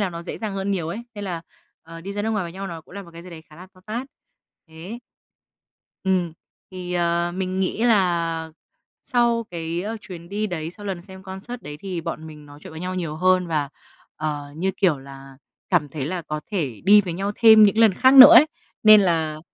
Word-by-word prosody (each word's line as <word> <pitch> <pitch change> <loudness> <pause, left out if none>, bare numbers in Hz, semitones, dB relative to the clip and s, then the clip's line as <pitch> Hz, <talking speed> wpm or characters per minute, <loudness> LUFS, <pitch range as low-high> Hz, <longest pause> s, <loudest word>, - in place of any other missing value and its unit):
là 195 -3 0
nó 170 0 -7
dễ - - -7
dàng 215 -3 -4
hơn 195 +1 -3
nhiều 175 -5 -2
ấy. 210 +8 -5
Nên 205 -1 -6
là, 170 -3 -5 0.4
ờ, 165 0 -11
đi 195 +4 -7
ra 205 0 -3
nước 220 - -1
ngoài 210 -4 -1
với 170 - -7
nhau 195 +1 -6
nó 165 -3 -7
cũng 175 - -18
là 200 - -6
một 170 - -15
cái 170 0 -11
gì 180 - -12
đấy 160 -1 -11
khá 155 -1 -19
là 185 +2 -12
to 185 - -20
tát. 235 +5 -4 0.6
Thế. 175 +9 -9 1.1
Ừm, 180 -3 0 0.4
thì, 180 -1 -7
ờ, 170 0 0
mình 190 0 -3
nghĩ 190 +4 -2
là 170 -7 +1 0.5
sau 235 -3 +1
cái 170 +1 -4 0.2
chuyến 170 -4 -11
đi 210 +2 -2
đấy, 165 -3 -5
sau 205 +2 -11
lần 185 -3 -4
xem 190 0 -11
concert 195 +6 -8
đấy, 145 - -8
thì 185 -3 -5
bọn 160 -1 -6
mình 150 -2 -12
nói 145 0 -14
chuyện 190 - -10
với 160 +1 -9
nhau 185 +1 -4
nhiều 165 -4 -4
hơn. 185 +1 +2
Và, 150 -4 -1 0.5
ờ, 145 -2 -4
như 190 +3 0
kiểu 175 -8 +2
là 135 0 -13 0.3
cảm 165 -5 +2
thấy 140 -1 -5
là 175 0 -4
có 150 0 -5
thể 145 - -3
đi 205 +1 +7
với 185 -4 -5
nhau 195 +4 -3
thêm 220 -2 +7
những 210 +1 +4
lần 220 -5 +5
khác 260 +4 +4
nữa 265 -1 +11
ấy, 300 - +8 0.4
nên 215 -1 +8
là 160 -4 0
180 Hz, 225 wpm, -22 LUFS, 165-200 Hz, 1.1 s, nữa